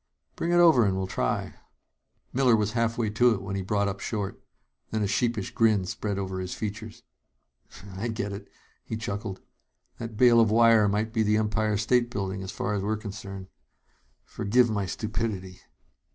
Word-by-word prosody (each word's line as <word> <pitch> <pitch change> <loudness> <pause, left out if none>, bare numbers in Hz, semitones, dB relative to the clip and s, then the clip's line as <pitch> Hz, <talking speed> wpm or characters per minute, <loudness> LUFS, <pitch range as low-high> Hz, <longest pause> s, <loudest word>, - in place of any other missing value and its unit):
"Bring 170 - -2
it - - +3
over 165 -8 +6
and 95 -2 +1
we'll 95 - -1
try 95 - -1
it." - - -11 0.8
Miller 125 -3 +4
was 105 -1 0
halfway 115 -1 0
to 120 +2 +4
it 95 - -6
when 100 0 -4
he 100 - -2
brought 100 +2 0
up 100 0 -3
short. 100 -3 -4 0.5
Then 110 -1 -1
a - - +1
sheepish 110 0 -1
grin 110 -4 +2
spread 100 +2 -3
over 95 -1 -3
his 90 -1 -4
features. 105 -1 -6 0.9
"I 105 +5 -3
get 110 -3 -3
it," 100 - -8 0.4
he 110 - -5
chuckled. 105 -3 -5 0.6
"That 115 -2 -6
bale 120 -1 +6
of 115 -2 +5
wire 115 -1 +5
might 105 +2 -1
be 115 - +1
the 105 0 +3
Empire 110 0 0
State 120 +3 +2
Building, 95 -4 -3
as 95 - -6
far 105 - -2
as 100 - -1
we're 105 +2 -1
concerned. 100 -2 -8 0.8
Forgive 120 +3 +2
my 100 -3 -1
stupidity." 105 -2 -4
105 Hz, 180 wpm, -27 LUFS, 100-115 Hz, 0.9 s, over